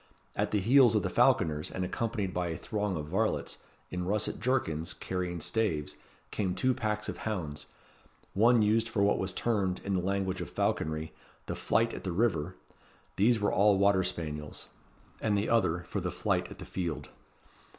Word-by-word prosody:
At -, -, 0 dB
the 105 Hz, -, +1 dB
heels 120 Hz, +2 st, +6 dB
of 105 Hz, -, +2 dB
the -, -, -1 dB
falconers, 75 Hz, -2 st, +3 dB
and 95 Hz, -, -3 dB
accompanied 105 Hz, -2 st, -2 dB
by 90 Hz, -1 st, -1 dB
a 80 Hz, -2 st, -3 dB
throng 105 Hz, -2 st, -2 dB
of 75 Hz, -, -4 dB
varlets, 110 Hz, +6 st, -1 dB, 0.3 s
in 90 Hz, 0 st, -2 dB
russet 105 Hz, +2 st, -1 dB
jerkins, 90 Hz, -10 st, 0 dB
carrying 90 Hz, -2 st, -3 dB
staves, 75 Hz, -6 st, -1 dB, 0.4 s
came 95 Hz, -4 st, -1 dB
two 130 Hz, 0 st, +2 dB
packs 105 Hz, -2 st, -2 dB
of -, -, -4 dB
hounds, 85 Hz, -9 st, -4 dB, 0.7 s
one 115 Hz, +2 st, +5 dB
used 110 Hz, +2 st, +2 dB
for 105 Hz, -3 st, +1 dB
what 100 Hz, -, +3 dB
was 95 Hz, 0 st, 0 dB
termed, 95 Hz, -3 st, 0 dB
in 100 Hz, -, -2 dB
the 90 Hz, -, +1 dB
language 95 Hz, 0 st, -1 dB
of 85 Hz, -, -5 dB
falconry, 80 Hz, 0 st, -1 dB, 0.3 s
the -, -, -3 dB
Flight 115 Hz, +1 st, +1 dB
at -, -, -7 dB
the 95 Hz, -, -2 dB
River, 90 Hz, -4 st, 0 dB, 0.6 s
these 115 Hz, +3 st, +4 dB
were 105 Hz, -, +1 dB
all 100 Hz, 0 st, +5 dB
water 100 Hz, -1 st, +4 dB
spaniels; 75 Hz, -4 st, -4 dB, 0.5 s
and 105 Hz, -2 st, +2 dB
the 100 Hz, -, 0 dB
other, 95 Hz, -7 st, +2 dB
for 85 Hz, -, -4 dB
the -, -, -2 dB
Flight -, -, 0 dB
at -, -, -10 dB
the -, -, -8 dB
Field. 85 Hz, -4 st, -4 dB
95 Hz, 180 wpm, -30 LUFS, 85-110 Hz, 0.7 s, heels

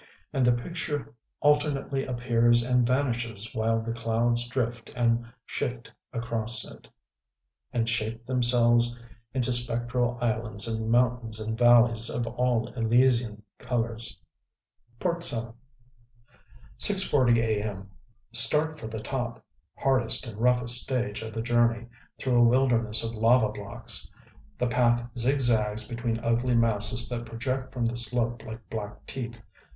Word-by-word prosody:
And 135 Hz, -, +1 dB
the 125 Hz, -, +5 dB
picture 145 Hz, +2 st, -4 dB, 0.3 s
alternately 145 Hz, -2 st, +1 dB
appears 120 Hz, -1 st, +2 dB
and 125 Hz, -1 st, +2 dB
vanishes 120 Hz, -5 st, -1 dB
while 115 Hz, +1 st, 0 dB
the 115 Hz, 0 st, -3 dB
clouds 115 Hz, +1 st, 0 dB
drift 120 Hz, -1 st, -3 dB
and 120 Hz, -1 st, +1 dB, 0.2 s
shift 125 Hz, 0 st, -4 dB, 0.2 s
across 115 Hz, -1 st, 0 dB
it, -, -, -13 dB, 0.8 s
and 115 Hz, -1 st, -1 dB
shape 115 Hz, 0 st, -2 dB
themselves 120 Hz, -1 st, +2 dB, 0.4 s
into 125 Hz, -1 st, +2 dB
spectral 120 Hz, 0 st, 0 dB
islands 115 Hz, -3 st, -1 dB
and 110 Hz, -1 st, -3 dB
mountains 120 Hz, -2 st, +1 dB
and 110 Hz, +1 st, -3 dB
valleys 120 Hz, -1 st, +4 dB
of 120 Hz, -, -3 dB
all 120 Hz, -1 st, -1 dB
Elysian 115 Hz, -2 st, +1 dB, 0.2 s
colors.... 115 Hz, -2 st, -4 dB, 0.8 s
VII 180 Hz, -, 0 dB, 1.7 s
6:40 145 Hz, -, +3 dB
a. 110 Hz, -2 st, 0 dB
m. 100 Hz, -2 st, -6 dB, 0.4 s
Start 150 Hz, +7 st, +4 dB
for 110 Hz, -, -7 dB
the 110 Hz, -1 st, -6 dB
top.... 120 Hz, -3 st, -4 dB, 0.3 s
Hardest 130 Hz, -4 st, 0 dB
and 110 Hz, -3 st, -9 dB
roughest 125 Hz, 0 st, +3 dB
stage 120 Hz, -5 st, -2 dB
of 110 Hz, 0 st, -6 dB
the 110 Hz, +1 st, -4 dB
journey, 120 Hz, -1 st, +1 dB, 0.3 s
through 125 Hz, -2 st, 0 dB
a -, -, +6 dB
wilderness 115 Hz, -3 st, +2 dB
of 115 Hz, 0 st, -4 dB
lava 115 Hz, 0 st, +3 dB
blocks. 105 Hz, -1 st, -1 dB, 0.5 s
The 125 Hz, -, 0 dB
path 120 Hz, -1 st, +1 dB
zigzags 120 Hz, -4 st, +2 dB
between 115 Hz, -1 st, -3 dB
ugly 120 Hz, +2 st, +1 dB
masses 115 Hz, 0 st, +2 dB
that 120 Hz, -1 st, -5 dB
project 130 Hz, +3 st, -4 dB
from 120 Hz, -2 st, -2 dB
the 115 Hz, +1 st, -1 dB
slope 120 Hz, 0 st, -1 dB
like 110 Hz, +1 st, -10 dB
black 105 Hz, -2 st, -7 dB
teeth. 120 Hz, -4 st, -7 dB
120 Hz, 130 wpm, -27 LUFS, 115-125 Hz, 1.7 s, a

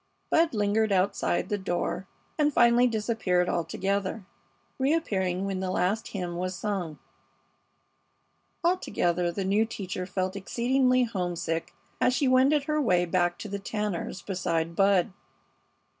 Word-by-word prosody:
Bud 325 Hz, -5 st, +3 dB
lingered 210 Hz, +1 st, +1 dB
outside 185 Hz, -2 st, +1 dB
the 205 Hz, -, -1 dB
door 185 Hz, 0 st, -2 dB, 0.3 s
and 300 Hz, -1 st, +2 dB
finally 240 Hz, -1 st, +5 dB
disappeared 215 Hz, -6 st, 0 dB
altogether, 195 Hz, +4 st, -2 dB, 0.5 s
reappearing 195 Hz, -, 0 dB
when 195 Hz, -1 st, -2 dB
the 190 Hz, -1 st, -2 dB
last 195 Hz, +5 st, 0 dB
hymn 175 Hz, -3 st, -4 dB
was 185 Hz, +1 st, -2 dB
sung. 180 Hz, -5 st, -3 dB, 1.7 s
Altogether 180 Hz, -, +1 dB
the 195 Hz, +2 st, -3 dB
new 200 Hz, +3 st, +3 dB
teacher 185 Hz, -4 st, -5 dB
felt 185 Hz, 0 st, -2 dB
exceedingly 255 Hz, +5 st, +2 dB
homesick 175 Hz, -6 st, -3 dB, 0.3 s
as 250 Hz, -, +3 dB
she 275 Hz, -, +1 dB
wended 265 Hz, +3 st, +4 dB
her 305 Hz, +1 st, 0 dB
way 180 Hz, -9 st, +3 dB
back 175 Hz, 0 st, +1 dB
to -, -, -7 dB
the 200 Hz, 0 st, -4 dB
Tanners' 200 Hz, -2 st, -3 dB
beside 170 Hz, -3 st, -2 dB
Bud. 195 Hz, 0 st, +3 dB
195 Hz, 130 wpm, -27 LUFS, 180-235 Hz, 1.7 s, finally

